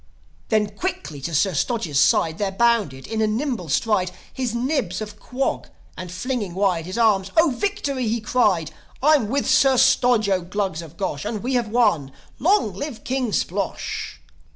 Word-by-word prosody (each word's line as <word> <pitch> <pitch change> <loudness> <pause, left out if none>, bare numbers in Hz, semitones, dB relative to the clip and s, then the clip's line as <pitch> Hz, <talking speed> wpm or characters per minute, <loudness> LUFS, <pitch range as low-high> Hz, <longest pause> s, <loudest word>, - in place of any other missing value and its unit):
Then, 215 -2 +2
quickly 155 - -4
to 165 +3 -3
Sir 185 +6 +2
Stodge's 165 - 0
side 160 +2 +3
There 200 -2 0
bounded, 200 - +1
in 220 0 -2
a - - +3
single 220 - -2
stride, 190 +4 +1 0.2
His 250 -3 -2
Nibs 240 - -1
of 210 -1 -7
Quog; 260 +5 -2 0.3
and 180 -1 -7
flinging 205 -2 -3
wide 185 -4 +1
His 185 - -5
arms, 205 -5 +3
"O 325 -2 +5
victory!" 285 - -2
he 230 +2 0
cried. 210 -7 +1 0.3
"I'm 290 -7 +4
with 280 +3 0
Sir 270 -1 +4
Stodge, 245 -3 +4
0 190 -2 +1
Glugs 190 -2 -2
of 165 0 -12
Gosh! 150 -7 -3
And 210 0 -4
we 260 +2 -1
have 240 -3 +1
won! 210 - +2 0.3
Long 345 - +2
live 245 +5 -6
King 255 -3 -1
Splosh!" 195 0 -3
215 Hz, 170 wpm, -22 LUFS, 185-250 Hz, 0.3 s, O